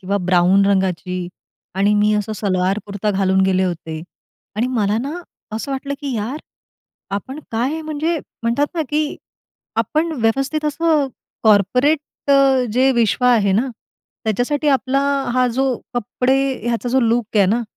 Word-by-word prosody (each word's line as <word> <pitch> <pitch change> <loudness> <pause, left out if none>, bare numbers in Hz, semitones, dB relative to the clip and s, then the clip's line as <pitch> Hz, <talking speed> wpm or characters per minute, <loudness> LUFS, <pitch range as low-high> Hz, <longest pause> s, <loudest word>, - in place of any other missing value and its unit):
किंवा 195 +2 -1
ब्राऊन 185 +2 +4
रंगाची 185 -2 0 0.5
आणि 200 +2 +2
मी 210 +1 +3
असा 210 +1 -1
सलवार-कुर्ता 200 +1 -1
घालून 190 -1 +2
गेले 190 0 +2
होते 160 -3 -4 0.5
आणि 230 +3 +1
मला 220 -4 0
ना 280 +7 -4 0.4
असं 250 +6 -4
वाटलं 280 +1 -3
की, 280 -3 -3
"यार, 225 +7 -3 0.7
आपण 205 +8 -4
काय, 260 +8 -1
म्हणजे 315 +2 -1 0.2
म्हणतात 235 +5 +1
ना, 330 - 0
की 300 0 -1 0.6
आपण 320 +2 0
व्यवस्थित 270 +7 0
असं 305 -1 +2 0.4
कॉर्पोरेट 230 +8 +4 0.7
जे 260 +3 +4
विश्व 235 +1 +1
आहे 225 -6 +4
ना, 225 +7 +2 0.6
त्याच्यासाठी 250 +8 0
आपला 270 0 +2 0.3
हा 255 0 +3
जो 265 +2 +1 0.3
कपडे, 250 +3 0 0.3
ह्याचा 240 +1 -1
जो 260 +2 +2
लुक 230 -2 0
आहे 200 -2 +5
ना, 230 +5 +1
230 Hz, 140 wpm, -19 LUFS, 200-270 Hz, 0.7 s, आहे